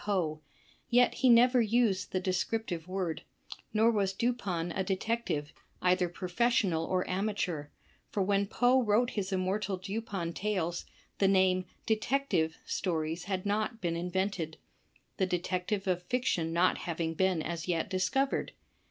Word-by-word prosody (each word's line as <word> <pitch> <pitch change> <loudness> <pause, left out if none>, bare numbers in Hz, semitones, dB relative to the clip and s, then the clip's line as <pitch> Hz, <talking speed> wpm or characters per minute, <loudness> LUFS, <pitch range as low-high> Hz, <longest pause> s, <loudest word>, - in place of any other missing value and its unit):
Poe, 170 -7 -1 0.5
yet 245 0 +5
he 260 - +3
never 245 +1 +6
used 220 -3 +1
the 185 - 0
descriptive 185 -1 -2
word, 185 -4 -2 0.5
nor 225 +2 +4
was 200 -3 +1
Dupin 195 -7 -1
a 190 - -1
detective, 190 -6 -2 0.3
either 180 -1 +2
professional 180 -2 +1
or 185 +1 0
amateur, 185 -6 -1 0.4
for 200 - 0
when 200 +1 +1
Poe 245 +4 +3
wrote 230 +2 +2
his 200 -2 -3
immortal 190 +1 -1
Dupin 195 -3 -4
tales, 185 -4 -2 0.3
the 195 - +4
name 185 -1 +3 0.2
"Detective" 215 -8 +1
Stories 165 -2 -2
had 190 -1 -2
not 215 +3 -1
been 170 -4 -1
invented; 180 -2 -2 0.6
the 190 - +1
detective 185 +3 -1
of 180 -2 0
fiction 180 -6 0
not 175 +2 +2
having 165 -1 -2
been 185 -1 +1
as 170 0 -4
yet 170 -2 0
discovered. 185 +9 0
190 Hz, 135 wpm, -31 LUFS, 175-215 Hz, 0.6 s, never